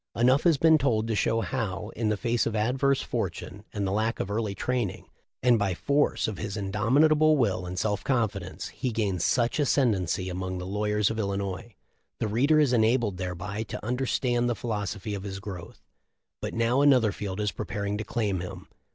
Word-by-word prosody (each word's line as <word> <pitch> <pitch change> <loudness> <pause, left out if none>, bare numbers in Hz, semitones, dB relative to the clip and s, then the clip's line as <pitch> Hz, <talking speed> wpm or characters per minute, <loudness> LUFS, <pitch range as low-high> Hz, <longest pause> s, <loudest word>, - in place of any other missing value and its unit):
Enough 130 +6 +3
has 165 -4 +5
been 160 +1 +5
told 115 -5 +1
to 110 - 0
show 115 +2 +1
how, 105 -5 -3
in 115 -1 -2
the 105 - 0
face 120 +2 0
of 115 - -2
adverse 130 +5 +1
fortune 100 +2 -4
and 100 -2 -2
the 95 - -1
lack 110 +3 0
of 100 - -3
early 105 -2 -1
training 120 -2 -2 0.4
and 120 -2 +5
by 95 -3 0
force 145 +9 +1
of 110 -4 -5
his 100 +1 -4
indomitable 145 +10 +3
will 95 -8 0
and 90 +1 -5
self 105 +1 -1
confidence, 110 -8 -2
he 130 - -3
gained 100 -6 -1
such 120 - +1
ascendency 105 - +1
among 95 0 -3
the 90 - -5
lawyers 105 +2 0
of 110 - -3
Illinois. 100 +1 -3 0.4
The 110 - 0
reader 140 +9 +3
is 145 -4 +3
enabled 115 -3 +2
thereby 90 +3 -4
to 110 - -6
understand 120 0 0
the 120 - 0
philosophy 105 -2 -3
of 100 - -4
his 100 0 -6
growth. 95 -4 -8 0.6
But - - -4
now 115 +4 +2
another 130 -7 +5
field 100 -1 -5
is 105 -1 0
preparing 100 0 -3
to - - -2
claim 105 -5 -1
him. 90 +1 -8
110 Hz, 185 wpm, -27 LUFS, 100-120 Hz, 0.6 s, has